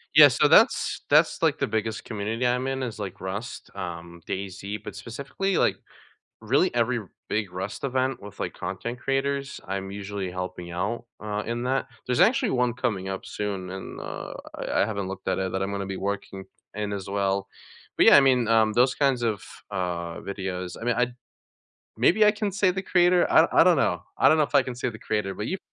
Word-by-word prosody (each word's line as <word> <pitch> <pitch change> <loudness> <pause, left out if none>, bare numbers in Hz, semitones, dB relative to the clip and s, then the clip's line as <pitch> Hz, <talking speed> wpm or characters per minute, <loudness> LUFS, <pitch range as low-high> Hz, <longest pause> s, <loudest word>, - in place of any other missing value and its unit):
Yeah, - - +11
so - - +3
that's - - +4
that's, - - +4
like - - +3
the - - +1
biggest 110 0 -2
community 110 +3 -3
I'm 125 +1 +1
in 135 0 -2
is, 120 -4 -4
like, 100 -1 -6
Rust, 100 +5 -5
um, 85 -2 -7
Daisy, 100 +1 -4
but 105 -1 -9
specifically, 140 - -3
like, - - +2 0.6
really 135 +11 +2
every 120 +1 +2 0.3
big 105 -3 -1
Rust 95 +2 -5
event 130 -2 0
with, 100 -1 -11
like, - - -3
content 120 +1 -5
creators, 135 +1 -1
I'm 95 0 -3
usually 100 -1 -4
helping 90 -1 -6
out, 100 +7 -3
uh, 105 0 -3
in 120 +1 -3
that 135 +1 0 0.2
there's 125 -1 0
actually 255 0 +4
one 125 -2 +1
coming 100 -6 -2
up 95 - -5
soon 95 -3 -4
and, 95 0 -7
uh, - - -6 0.2
I - - -1
I - - +4
haven't 100 -3 -3
looked 95 0 -7
at 95 - +1
it, 95 -1 -1
that 95 0 -1
I'm 95 - -2
gonna 100 -1 -3
be 95 - -4
working 100 -1 -4 0.3
in, 105 -1 -2
as 100 -1 -5
well. 100 -1 0 0.5
But - - +5
yeah, - - +9
I - - +8
mean, 125 -3 +3
um, 110 -1 +4
those 125 +2 +4
kinds 135 -4 +2
of, 110 -4 -1 0.3
uh, 85 -3 -3
videos, 95 -2 -5
I - - -8
mean, 120 -1 +2
I 125 -1 +2 0.9
maybe 215 +5 +5
I 210 - +7
can 210 -1 -2
say 195 -1 +2
the 190 +1 -3
creator? 175 -1 +3
I 160 - +7
I - - +7
don't 180 -2 +5
know. - - +1
I - - +5
don't 155 - +4
know 155 - +5
if - - -21
I 140 - +7
can 125 - -5
say 125 - -2
the 110 -2 -7
creator, 105 -3 -2
but 105 - -4
you 190 - -2
105 Hz, 210 wpm, -26 LUFS, 95-130 Hz, 0.9 s, Yeah